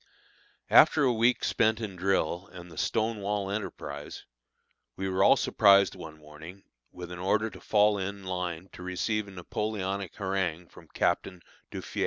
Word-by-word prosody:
After 155 Hz, -1 st, +7 dB
a 130 Hz, -3 st, +3 dB
week 120 Hz, +2 st, +2 dB
spent 110 Hz, -1 st, +2 dB
in 105 Hz, -4 st, -5 dB
drill 90 Hz, -1 st, 0 dB
and 90 Hz, -1 st, -11 dB
the 80 Hz, -, -13 dB
stone 110 Hz, 0 st, 0 dB
wall 100 Hz, -1 st, -2 dB
enterprise, 75 Hz, -8 st, -6 dB, 0.7 s
we 95 Hz, -, -3 dB
were 95 Hz, 0 st, +1 dB
all -, -, +6 dB
surprised 100 Hz, -3 st, +4 dB
one 80 Hz, -1 st, -10 dB
morning 80 Hz, +5 st, -12 dB, 0.3 s
with 90 Hz, 0 st, -9 dB
an 90 Hz, -, -7 dB
order 105 Hz, +4 st, 0 dB
to -, -, -13 dB
fall 105 Hz, -1 st, +3 dB
into 95 Hz, 0 st, -5 dB
line 90 Hz, -1 st, -4 dB
to -, -, -11 dB
receive 100 Hz, +4 st, -2 dB
a -, -, -11 dB
Napoleonic 100 Hz, 0 st, -4 dB
harangue 95 Hz, -4 st, -2 dB
from -, -, -16 dB
Captain 90 Hz, 0 st, -1 dB, 0.3 s
Duffié. -, -, -6 dB
95 Hz, 160 wpm, -28 LUFS, 90-105 Hz, 0.7 s, After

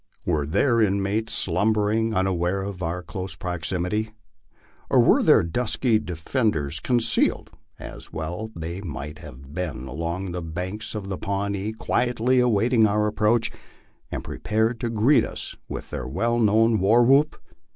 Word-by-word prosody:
Were 75 Hz, -5 st, 0 dB
their 115 Hz, -, +2 dB
inmates 100 Hz, +2 st, +1 dB
slumbering, 105 Hz, +4 st, +1 dB
unaware 95 Hz, 0 st, 0 dB
of 95 Hz, -2 st, -6 dB
our 90 Hz, +1 st, -3 dB
close 95 Hz, +3 st, -5 dB
proximity, 90 Hz, +4 st, -2 dB, 0.8 s
or -, -, +4 dB
were -, -, +5 dB
their -, -, +5 dB
dusky 115 Hz, +5 st, +1 dB
defenders 85 Hz, -, -1 dB
concealed, 120 Hz, +1 st, +1 dB, 0.3 s
as -, -, -10 dB
well 85 Hz, +8 st, -5 dB
they 85 Hz, +3 st, -5 dB
might 75 Hz, -4 st, -6 dB
have 70 Hz, 0 st, -12 dB
been, 80 Hz, -7 st, -4 dB
along 85 Hz, +7 st, -4 dB
the 90 Hz, 0 st, -4 dB
banks 90 Hz, +7 st, -4 dB
of 100 Hz, -2 st, -5 dB
the 95 Hz, -1 st, -4 dB
Pawnee, 100 Hz, +1 st, -2 dB
quietly 120 Hz, +2 st, +1 dB
awaiting 115 Hz, -1 st, +3 dB
our 105 Hz, +1 st, +1 dB
approach, 110 Hz, +2 st, +1 dB, 0.6 s
and -, -, -4 dB
prepared 110 Hz, +2 st, -1 dB
to 120 Hz, -, -2 dB
greet 115 Hz, +6 st, +4 dB
us -, -, -5 dB
with -, -, -6 dB
their -, -, -4 dB
well 115 Hz, -, 0 dB
known 110 Hz, 0 st, +4 dB
war 110 Hz, +6 st, +5 dB
whoop? 140 Hz, +5 st, +4 dB
100 Hz, 140 wpm, -24 LUFS, 85-110 Hz, 0.8 s, were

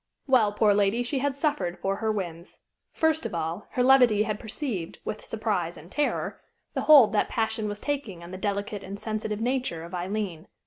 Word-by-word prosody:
Well, 245 Hz, -7 st, +4 dB
poor 210 Hz, 0 st, +3 dB
lady, 205 Hz, +4 st, +2 dB
she 265 Hz, +3 st, -1 dB
had 280 Hz, 0 st, 0 dB
suffered 280 Hz, -, -1 dB
for 195 Hz, 0 st, -1 dB
her 220 Hz, 0 st, 0 dB
whims. 175 Hz, -5 st, -5 dB, 0.3 s
First 320 Hz, 0 st, +2 dB
of -, -, -4 dB
all, 165 Hz, +4 st, -3 dB
her 250 Hz, -, +2 dB
levity 250 Hz, -5 st, +6 dB
had 215 Hz, -1 st, -3 dB
perceived, 220 Hz, -, -4 dB
with 215 Hz, -, -4 dB
surprise 200 Hz, -6 st, -2 dB
and 170 Hz, +4 st, -13 dB
terror, 295 Hz, -1 st, -1 dB, 0.3 s
the -, -, -1 dB
hold 275 Hz, -9 st, +8 dB
that 210 Hz, -, +2 dB
passion 220 Hz, -1 st, -1 dB
was 205 Hz, 0 st, -5 dB
taking 240 Hz, -, -3 dB
on 170 Hz, -, -10 dB
the 185 Hz, -, -6 dB
delicate 200 Hz, 0 st, -2 dB
and 200 Hz, +1 st, -7 dB
sensitive 215 Hz, 0 st, -3 dB
nature 245 Hz, -9 st, -1 dB
of 170 Hz, +2 st, -10 dB
Aileen. 180 Hz, -2 st, -3 dB
210 Hz, 190 wpm, -27 LUFS, 190-245 Hz, 0.3 s, hold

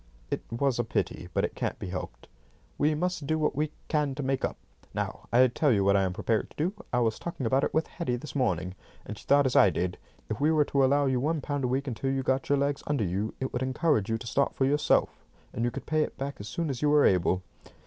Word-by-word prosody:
"It -, -, -1 dB
was 120 Hz, +1 st, 0 dB
a -, -, +3 dB
pity, 115 Hz, -, -2 dB
but -, -, +1 dB
it -, -, -5 dB
can't -, -, -3 dB
be -, -, -6 dB
helped." -, -, -6 dB, 0.5 s
"We 150 Hz, +1 st, +3 dB
must 175 Hz, -2 st, -2 dB
do 155 Hz, -, +1 dB
what 155 Hz, -1 st, 0 dB
we 150 Hz, +1 st, -1 dB, 0.2 s
can 150 Hz, -3 st, 0 dB
to 145 Hz, -, -4 dB
make 135 Hz, 0 st, -1 dB
up. -, -, -1 dB, 0.4 s
Now, -, -, -4 dB
I 125 Hz, +2 st, +6 dB
tell 130 Hz, +4 st, +2 dB
you 100 Hz, -4 st, +3 dB
what 100 Hz, 0 st, +4 dB
I 100 Hz, -, +4 dB
am 95 Hz, -1 st, 0 dB
prepared 110 Hz, +4 st, -1 dB
to -, -, -21 dB
do. 170 Hz, +6 st, 0 dB, 0.2 s
I 125 Hz, -, +2 dB
was 110 Hz, -2 st, 0 dB
talking 170 Hz, -7 st, -4 dB
about 130 Hz, +4 st, +2 dB
it -, -, 0 dB
with 160 Hz, -, +1 dB
Hetty 165 Hz, -8 st, -3 dB
this 125 Hz, +5 st, -7 dB
morning, 90 Hz, -9 st, 0 dB, 0.3 s
and 105 Hz, -, -6 dB
she -, -, -14 dB
thought 140 Hz, 0 st, +5 dB
as 130 Hz, -, 0 dB
I 100 Hz, -, +7 dB
did. 90 Hz, +2 st, -2 dB, 0.3 s
If 110 Hz, +4 st, -4 dB
we 150 Hz, -, +4 dB
were 155 Hz, -2 st, +4 dB
to 140 Hz, -1 st, +2 dB
allow 140 Hz, +2 st, +3 dB
you 130 Hz, -2 st, +1 dB
one 155 Hz, +4 st, 0 dB
pound 145 Hz, -1 st, -2 dB
a -, -, +2 dB
week 135 Hz, +3 st, 0 dB
until 130 Hz, +1 st, -2 dB
you 135 Hz, 0 st, 0 dB
got 130 Hz, +1 st, 0 dB
your 145 Hz, -, +4 dB
legs 140 Hz, 0 st, 0 dB
under 145 Hz, -6 st, +1 dB
you, 100 Hz, +4 st, -2 dB
it 130 Hz, -, -3 dB
would 125 Hz, -, -2 dB
encourage 130 Hz, -, +1 dB
you 115 Hz, -, +1 dB
to 115 Hz, -, -10 dB
start 140 Hz, +4 st, 0 dB
for 135 Hz, -, +2 dB
yourself, 145 Hz, +2 st, +2 dB, 0.3 s
and 115 Hz, -, -2 dB
you 120 Hz, -, +2 dB
could -, -, -7 dB
pay 155 Hz, 0 st, +1 dB
it -, -, -2 dB
back 140 Hz, +1 st, -4 dB
as 100 Hz, -, -7 dB
soon 165 Hz, +5 st, -2 dB
as 130 Hz, -, -5 dB
you 150 Hz, -, +3 dB
were 150 Hz, 0 st, +5 dB
able." 90 Hz, 0 st, +2 dB
130 Hz, 270 wpm, -28 LUFS, 115-145 Hz, 0.5 s, I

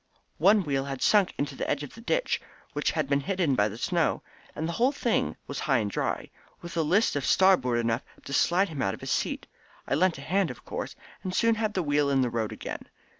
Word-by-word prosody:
One 200 Hz, +5 st, +5 dB
wheel 140 Hz, -3 st, -1 dB
had 135 Hz, -2 st, -4 dB
sunk 205 Hz, -3 st, +4 dB
into 140 Hz, -1 st, -2 dB
the -, -, -3 dB
edge 145 Hz, 0 st, 0 dB
of 145 Hz, -, -8 dB
the 230 Hz, -, -12 dB
ditch -, -, 0 dB, 0.3 s
which -, -, 0 dB
had 155 Hz, -3 st, -1 dB
been 140 Hz, 0 st, +2 dB
hidden 180 Hz, -2 st, 0 dB
by 105 Hz, -5 st, +3 dB
the 110 Hz, +1 st, -7 dB
snow, 170 Hz, +6 st, 0 dB, 0.3 s
and 160 Hz, -, -2 dB
the -, -, -2 dB
whole 245 Hz, +9 st, +2 dB
thing 240 Hz, -5 st, 0 dB
was 140 Hz, -, -5 dB
high 135 Hz, -3 st, +2 dB
and 105 Hz, -3 st, -1 dB
dry, -, -, -2 dB, 0.3 s
with 170 Hz, -1 st, -8 dB
a 165 Hz, -, +2 dB
list 185 Hz, +9 st, +3 dB
to 145 Hz, -, -1 dB
starboard 135 Hz, -8 st, +4 dB
enough 115 Hz, +1 st, 0 dB, 0.2 s
to 140 Hz, -, -6 dB
slide 180 Hz, +6 st, +3 dB
him 150 Hz, -4 st, -4 dB
out 95 Hz, -, 0 dB
of -, -, -17 dB
his -, -, -4 dB
seat. -, -, -1 dB, 0.4 s
I -, -, 0 dB
lent 175 Hz, +3 st, +2 dB
a -, -, -8 dB
hand, 185 Hz, +3 st, +1 dB
of 125 Hz, -, -9 dB
course, -, -, -5 dB, 0.3 s
and 185 Hz, -1 st, -4 dB
soon 230 Hz, +3 st, +4 dB
had 215 Hz, -1 st, -1 dB
the 185 Hz, -, +1 dB
wheel 145 Hz, -1 st, +2 dB
in 135 Hz, -1 st, +3 dB
the 125 Hz, -2 st, 0 dB
road 110 Hz, -2 st, -1 dB
again. -, -, -7 dB
155 Hz, 240 wpm, -28 LUFS, 135-190 Hz, 0.4 s, One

